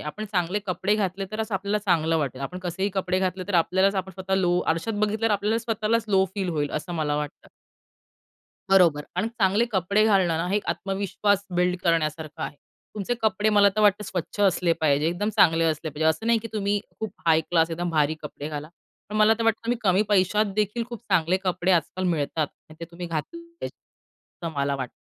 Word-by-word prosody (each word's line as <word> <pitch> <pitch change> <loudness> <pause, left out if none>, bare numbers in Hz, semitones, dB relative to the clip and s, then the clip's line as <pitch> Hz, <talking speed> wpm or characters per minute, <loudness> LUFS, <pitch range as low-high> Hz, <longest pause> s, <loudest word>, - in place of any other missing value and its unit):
आपण 150 +9 -5
चांगले 180 +1 0
कपडे 190 +3 0
घातले 195 -2 -1
तरच 220 0 -3
आपल्याला 200 +2 0
चांगलं 165 -5 +1
वाटेल. 135 -3 -3
आपण 180 +7 -5
कसेही 185 +2 -2
कपडे 185 -1 0
घातले. 185 0 -1
तर 195 - -2
आपल्यालाच 190 +4 +3
आपण 190 0 -3
स्वतः 190 +1 -2
लो 175 -1 +2
आरशात 165 +8 -3
बघितलं 215 +2 0
तर 225 - +1
आपल्याला 210 +2 +1
स्वतःलाच 225 0 0
लो 190 -2 +4
फील 190 -3 -2
होईल, 150 -3 -1
असं 155 +3 -4
मला 150 -2 0
वाटतं. 150 -1 -6 1.2
बरोबर. 170 -6 +5
आणि 205 +5 0
चांगले 215 -1 +2
कपडे 200 +3 +2
घालणं 190 -6 +3
ना, 165 - -1
हे 200 - +1
एक 210 - -3
आत्मविश्वास 200 +1 0
बिल्ड 180 0 +2
करण्यासारखं 155 -3 -1
आहे. 145 - -5 0.4
तुमचे 210 +3 -2
कपडे 215 0 +2
मला 205 -1 +6
तर 215 - +2
वाटतं 210 0 +3
स्वच्छ 185 +2 -5
असले 180 -3 +3
पाहिजे. 150 0 +2
एकदम 175 +5 -1
चांगले 165 -4 +5
असले 155 -1 -1
पाहिजे. 150 +2 -3
असं 160 +8 -1
नाही 230 0 +4
की 230 +1 -7
तुम्ही 205 -1 0 0.2
खूप 220 -1 -4
हाय 160 -1 +5
क्लास 165 0 +1
एकदम 175 +1 -2
भारी 155 -1 +2
कपडे 150 0 -6
घाला. 150 0 -6 0.4
पण 210 - -4
मला 215 +1 +5
तर 230 - -1
वाटतं 225 0 +1
तुम्ही 235 0 0
कमी 190 -1 +3
पैशात 205 +1 +3
देखील 215 +3 0
खूप 235 -2 -7
चांगले 180 0 +3
कपडे 180 0 0
आजकाल 185 +2 0
मिळतात 155 -2 0 0.2
आणि 155 - -13
ते - - -4
तुम्ही 175 +1 -7
घातले 165 - -4
पाहिजे 335 0 -8 0.8
असं 165 - -4
मला 140 0 0
वाटतं. 130 -2 -6
185 Hz, 200 wpm, -25 LUFS, 165-210 Hz, 1.2 s, मला